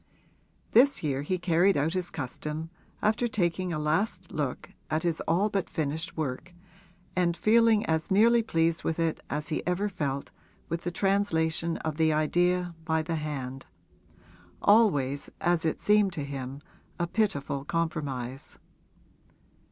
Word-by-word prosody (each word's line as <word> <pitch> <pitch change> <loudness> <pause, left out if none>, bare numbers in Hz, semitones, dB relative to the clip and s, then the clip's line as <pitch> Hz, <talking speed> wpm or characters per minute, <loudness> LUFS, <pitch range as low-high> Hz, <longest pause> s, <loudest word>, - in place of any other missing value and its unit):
This 275 0 +5
year 140 -3 0
he 185 +6 -1
carried 175 +2 +3
out 150 +4 +1
his 185 -1 -1
custom 150 +3 -5 0.3
after 220 +3 +2
taking 185 -4 0
a 160 - -1
last 180 +4 -1
look 145 -5 -3 0.2
at 155 +1 0
his 170 -2 0
all 190 +5 +3
but 200 -3 -2
finished 160 +3 -3
work 155 +4 -4 0.6
and 175 -2 +1
feeling 225 +2 +4
as 160 -3 0
nearly 230 +4 +5
pleased 165 -6 +1
with 160 - -1
it 165 -2 0
as 150 - -3
he 155 - -1
ever 185 +4 0
felt 140 -7 -3 0.4
with 170 +1 -3
the - - +1
translation 170 -4 +1
of 155 -1 -2
the 160 -1 +3
idea 175 +3 +1
by 160 0 0
the 165 0 -2
hand 135 -4 -5 0.9
always, 145 - +3
as 175 -2 +1
it 160 - 0
seemed 205 -2 +3
to 150 - -3
him, 135 0 -6 0.4
a 175 - +1
pitiful 145 -8 -1
compromise. 140 -6 -3
165 Hz, 145 wpm, -28 LUFS, 150-185 Hz, 0.9 s, This